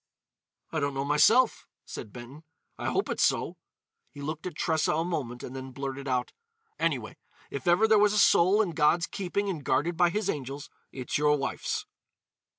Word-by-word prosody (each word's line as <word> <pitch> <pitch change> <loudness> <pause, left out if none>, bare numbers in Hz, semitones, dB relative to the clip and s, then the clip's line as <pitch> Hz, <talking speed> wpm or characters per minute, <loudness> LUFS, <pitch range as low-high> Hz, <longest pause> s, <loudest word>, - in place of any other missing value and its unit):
"I 160 - -1
don't 140 -1 -1
know 135 +1 -1
myself," 215 - +4 0.2
said 105 - -8
Benton. 125 +6 -11 0.3
"I - - -5
hope - - 0
it's - - -2
so." - - +1 0.5
He - - -14
looked 155 +4 -5
at 175 - -7
Tressa 160 -1 +1
a 165 +2 0
moment 130 -8 -4
and 130 - -7
then 130 0 -7
blurted 135 +1 -5
out: 125 -2 -1 0.5
"Anyway, - - -1 0.3
if - - -5
ever 175 +6 +5
there 215 -1 +5
was 210 0 +4
a - - 0
soul 200 +1 +5
in 185 - -3
God's 165 +2 +3
keeping 200 +1 -3
and 170 -7 -3
guarded 170 +6 +1
by 175 0 +4
His 210 +3 -2
angels, 140 -4 -4 0.2
it's 130 +2 -3
your 150 0 +3
wife's!" 135 - -3
155 Hz, 180 wpm, -28 LUFS, 140-180 Hz, 0.5 s, ever